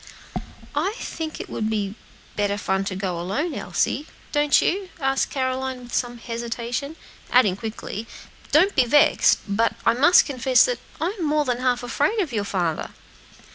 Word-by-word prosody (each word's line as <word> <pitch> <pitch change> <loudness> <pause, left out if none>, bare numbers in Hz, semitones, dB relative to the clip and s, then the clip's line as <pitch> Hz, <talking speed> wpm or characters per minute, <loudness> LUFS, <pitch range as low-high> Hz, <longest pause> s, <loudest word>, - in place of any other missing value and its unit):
"I 335 +8 0
think 320 -8 -5
it - - -6
would 215 -1 -2
be 205 -3 -1 0.4
better 205 -1 0
fun 190 -1 -1
to 195 - -3
go 185 -3 -2
alone, 215 - -2
Elsie 295 - -1 0.2
don't 295 0 +4
you?" 380 +1 0
asked 270 -1 +1
Caroline, 260 -1 -2
with 240 - -11
some 245 -1 -1
hesitation; 235 +5 -4 0.4
adding 215 -7 +5
quickly: 220 0 -6 0.4
"Don't 370 +7 +5
be 260 - +5
vexed, 290 +5 +4
but 220 +3 +1
I - - +5
must 290 +9 +6
confess 255 -2 +3
I 300 - -4
am - - -2
more 300 0 +2
than 245 -2 -1
half 250 -1 +1
afraid 290 - 0
of 330 -11 -1
your 205 -2 -1
father." 175 -5 -1
245 Hz, 160 wpm, -23 LUFS, 215-295 Hz, 0.4 s, must